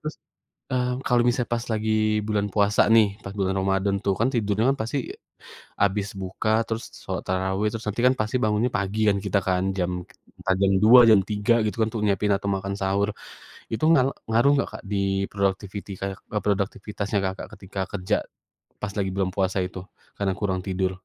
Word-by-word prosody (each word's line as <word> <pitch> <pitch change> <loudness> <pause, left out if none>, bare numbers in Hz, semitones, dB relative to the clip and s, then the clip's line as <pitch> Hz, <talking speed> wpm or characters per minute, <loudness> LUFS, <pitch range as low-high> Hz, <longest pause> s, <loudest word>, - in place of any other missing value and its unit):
Terus, 155 0 -5 0.6
eee, 125 -1 +1 0.2
kalau 120 -1 +4
misalnya 120 0 0
pas 115 0 -3
lagi 110 0 -1 0.4
bulan 105 -1 0
puasa 105 0 +4
nih, 110 -2 +7 0.2
pas 95 - -7
bulan 95 -1 0
ramadhan 95 +1 +1
tuh, 100 -1 +2
kan 120 - +3
tidurnya 105 0 +1 0.2
pasti, 115 +5 -2 0.8
habis 100 0 +2
buka 95 +3 -3 0.2
terus 115 +1 -3 0.2
sholat - - -4
tarawih, 95 +3 0
terus 110 -1 -6
nanti 110 +4 -2
kan 130 - +6
pasti 110 +3 -1
bangunnya 110 +3 +2
pagi 100 +2 -2
kan, 100 - +2
kita 100 0 +2
kan, 90 -1 +1
jam 90 -1 0 0.5
entah 95 -1 0
jam 100 0 +4
2, 120 +3 +9
jam 110 - +7
3, 105 +2 +2
gitu 105 - -2
kan, 110 - +3
untuk 110 -1 -3
nyiapin, 100 +1 +1
atau 100 0 -4
makan 100 +1 -3
sahur. 100 +2 +1 0.6
Itu 115 - -3
nga 135 - +5 0.3
ngaruh 120 +5 +4
nggak - - 0
Kak, - - -8
di 100 - 0 0.3
productivity 100 0 -2
kayak 95 0 -3
ke 105 - -1
produktivitasnya 100 +1 -1
Kakak 95 0 -4
ketika 95 0 -8
kerja, 100 +1 0 0.7
pas 100 -1 -4
lagi 95 -2 0
bulan 95 -1 0
puasa 95 -1 0
itu, 95 - -8 0.4
karena 95 -2 0
kurang 95 -3 -1
tidur? 95 0 0
100 Hz, 180 wpm, -25 LUFS, 95-110 Hz, 0.8 s, 2